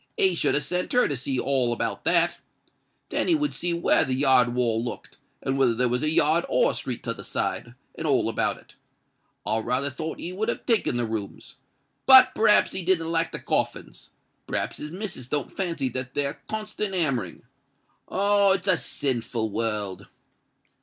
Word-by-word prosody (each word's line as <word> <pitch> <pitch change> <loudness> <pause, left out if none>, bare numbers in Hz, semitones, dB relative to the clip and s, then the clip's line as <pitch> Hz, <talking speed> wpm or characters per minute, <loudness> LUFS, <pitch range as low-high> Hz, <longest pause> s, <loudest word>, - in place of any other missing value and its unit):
He 190 -1 +3
should 170 - +1
have 145 - +1
sent 180 +5 -2
her 250 - +4
to 145 - -2
see 130 0 -3
all 130 -3 +1
about 120 - -3
that. - - +2 0.7
Then - - -1
he 340 - +4
would 295 -1 -1
see 175 - -2
where 170 -1 +3
the 130 -4 -1
yard 130 -3 +3
wall 115 -2 +1
looked—and 135 +2 -6
whether 125 -4 +3
there 125 +2 +1
was 125 +1 0
a 155 - +1
yard 155 +2 +3
or - - +3
a - - -7
street - - -5
t' - - -2
other - - -6
side—and - - -4
all - - +2
about - - 0
it. - - -19 0.7
I 110 +2 0
raly 130 +5 -1
thought 155 +4 -5
he 180 - -6
would 215 +4 -2
have - - -4
taken 220 - +1
the 120 - 0
rooms. 110 -3 -6 0.5
But 265 -1 +9
p'rhaps 210 -1 +4
he 190 - -3
didn't 165 -2 +1
like 165 0 0
the - - -4
coffins: - - -3 0.4
p'rhaps - - -3
his 150 - -6
missus 175 - -6
don't 145 0 -2
fancy 170 -8 -2
that 130 +1 -6
there 140 -1 -2
constant 215 -2 -4
hammering. 145 -9 -1 0.7
Ah! 200 0 +3
it's 190 0 -3
a 185 - +4
sinful 115 -5 -1
world!" 105 -3 -3
145 Hz, 180 wpm, -25 LUFS, 125-185 Hz, 0.7 s, But